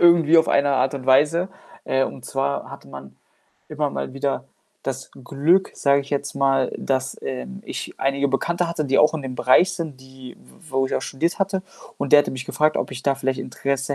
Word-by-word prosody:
irgendwie 170 -2 +6
auf 160 - +3
eine 140 0 +3
Art 130 +2 +1
und 130 -2 -6
Weise. 150 +8 +4 0.4
Äh, 135 0 +2
und 125 - -8
zwar 140 +1 -2
hatte - - -11
man 70 -1 -11 0.5
immer - - -1
mal 70 - -4
wieder 135 0 -2 0.4
das - - -4
Glück, 160 +9 +2
sage 140 0 +3
ich 140 - -11
jetzt 140 -1 -2
mal, 135 -2 +2
dass, 130 -1 -2
ähm, 65 -1 -5
ich - - -6
einige 140 +1 +1
Bekannte 170 +6 0
hatte, 165 -3 -2
die 135 0 +2
auch 150 - +4
in 155 - -3
dem 130 -1 -5
Bereich 130 +10 +4
sind, 160 -7 -6
die 130 -1 -12
w 160 -5 -19
wo 135 0 +1
ich - - -3
auch - - -1
studiert 170 +8 -2
hatte 195 -1 +1 0.4
und 140 - -3
der 145 - +10
hatte - - -3
mich 130 0 -5
gefragt, 155 +2 +1
ob - - -2
ich 130 - -7
da 140 -1 +1
vielleicht 135 -1 -1
Interesse 140 +2 -2
140 Hz, 210 wpm, -22 LUFS, 130-155 Hz, 0.5 s, der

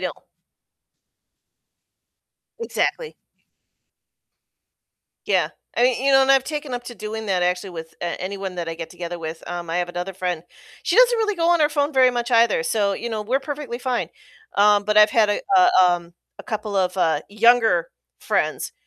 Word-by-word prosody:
know. - - -2 2.5
Exactly. 465 0 -2 2.1
Yeah. - - +2 0.3
I 240 - +2
mean, 250 0 +2
you 275 - +3
know, 270 - +6
and 265 - +2
I've 265 -1 +3
taken 295 -1 -5
up 245 0 -4
to 240 - -8
doing 215 +1 -6
that 185 -2 0
actually 180 +2 -1
with, 165 -1 -9
uh, 175 -1 -3
anyone 190 0 -5
that 170 -2 -4
I 165 - -4
get 165 0 -7
together 175 0 -6
with, 160 0 -7
um, 175 -1 -6
I 165 - -2
have 175 0 -1
another 180 +2 -5
friend, 180 -3 -3 0.4
she 355 - 0
doesn't - - +5
really 425 -2 0
go 335 -1 +1
on 345 -2 +3
her 300 - +4
phone 295 0 -1
very 260 -1 +5
much 240 0 -3
either, 230 -7 +3
so, 200 +3 0
you 235 +3 -5
know, 215 -1 -3
we're 255 +6 0
perfectly 275 -4 -6
fine. 250 -1 -2 0.5
Um, 205 0 +4
but 210 0 -1
I've 210 0 +7
had 220 -2 +3
a 205 - 0 0.2
a, 365 0 +6 0.2
um 170 -1 -4 0.2
a - - -9
couple 210 -2 -4
of, 185 0 0
uh, 160 -4 +1
younger 220 -5 +3 0.3
friends, - - -1
215 Hz, 180 wpm, -22 LUFS, 180-260 Hz, 2.5 s, I've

